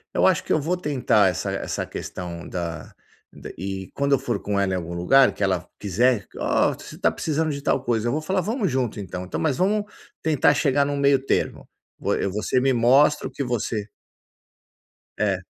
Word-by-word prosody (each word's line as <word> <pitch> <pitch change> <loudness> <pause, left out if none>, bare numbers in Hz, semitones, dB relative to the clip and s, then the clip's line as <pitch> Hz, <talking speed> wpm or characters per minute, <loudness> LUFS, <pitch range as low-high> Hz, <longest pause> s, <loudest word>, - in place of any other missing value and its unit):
eu - - +4
acho 185 -4 +2
que - - -6
eu 155 - +4
vou 170 +5 0
tentar 125 - +2
essa 90 - -3
essa - - -3
questão 85 -2 -7
da 85 -2 -5 0.6
e 95 +1 -5
quando 140 0 0
eu 135 - +4
for 120 -6 -2
com 100 -1 -1
ela 95 -1 +1
em - - +1
algum 85 -1 -5
lugar, 130 +11 +4
que - - -12
ela 95 -2 0
quiser, 105 +2 +1
"ó, - - +2
você - - -11
está - - +3
precisando 155 0 -1
de 140 -1 -5
tal 135 - +1
coisa", 120 -2 0
eu - - +1
vou 155 - -1
falar: 185 +3 0
"Vamos 215 - -1
junto, 125 -5 -1
então 90 -1 -5
então, 90 - -4
mas 145 -5 0
vamos 205 +3 +1 0.4
tentar 150 -2 +3
chegar 140 -1 +2
no 145 0 -2
meio-termo, 140 -1 +1 0.5
eu, 100 - -1
você 105 +5 0
me 135 0 +2
mostra 135 +6 +4
o - - -10
que 140 - -3
você" 115 -3 -2 1.3
É. - - 0
130 Hz, 195 wpm, -24 LUFS, 100-145 Hz, 1.3 s, eu